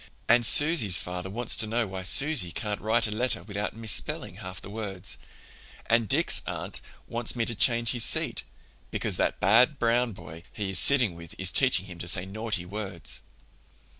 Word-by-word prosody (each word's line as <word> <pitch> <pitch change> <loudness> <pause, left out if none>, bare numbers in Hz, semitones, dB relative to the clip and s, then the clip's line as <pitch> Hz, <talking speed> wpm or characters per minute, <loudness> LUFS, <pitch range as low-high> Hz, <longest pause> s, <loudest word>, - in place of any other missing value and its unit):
And 120 0 +4
Susy's 145 - +5
father 90 +1 -5
wants 115 +4 0
to 110 - +3
know 115 +2 -1
why 95 -2 -7
Susy 135 - +2
can't 105 +4 -5
write 110 +2 +1
a 105 - -3
letter 125 +4 -1
without 105 0 -5
misspelling 110 -2 -2
half 90 0 -7
the - - -12
words, 100 -4 -5 0.7
and 115 -2 +1
Dick's - - +6
aunt - - -5 0.3
wants 120 0 -4
me 115 -1 -1
to 120 - -1
change 115 +1 +3
his 120 -3 0
seat, - - +1 0.5
because - - -3
that - - -1
bad 125 +8 +4
Brown 120 0 0
boy 80 -3 -12
he 100 -3 -5
is 95 - +4
sitting 130 -9 +3
with 85 -1 -13
is 95 -1 0
teaching 125 -8 +4
him 90 -3 -12
to 85 - -6
say 90 +1 +1
naughty 105 -1 -4
words. 95 -3 -5
110 Hz, 180 wpm, -26 LUFS, 95-120 Hz, 0.7 s, Dick's